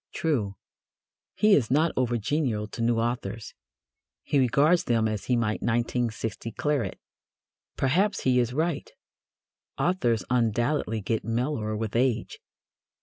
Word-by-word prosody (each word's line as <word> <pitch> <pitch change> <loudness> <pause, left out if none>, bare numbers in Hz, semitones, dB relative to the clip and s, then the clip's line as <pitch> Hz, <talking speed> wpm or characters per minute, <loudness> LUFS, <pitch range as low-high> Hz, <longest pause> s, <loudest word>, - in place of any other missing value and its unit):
True, 115 -12 -1 0.8
he 210 -1 +4
is 130 - +3
not 155 +5 +3
over 120 -2 +1
genial 115 -2 -1
to 115 - -6
new 115 0 +2
authors. 115 -3 -3 0.7
He 145 - +1
regards 140 +7 +3
them 115 -2 +2
as 110 -1 -3
he 125 - +2
might 110 -2 0
1916 115 -1 -2
claret. 140 -10 -1 0.8
Perhaps 190 +10 +1
he 125 -1 +3
is 120 -1 +1
right. 165 - -1 0.9
Authors 120 - +1
undoubtedly 120 0 0
get 110 +3 -1
mellower 115 -1 -1
with 110 0 -4
age. 120 -2 0
120 Hz, 125 wpm, -27 LUFS, 110-140 Hz, 0.9 s, he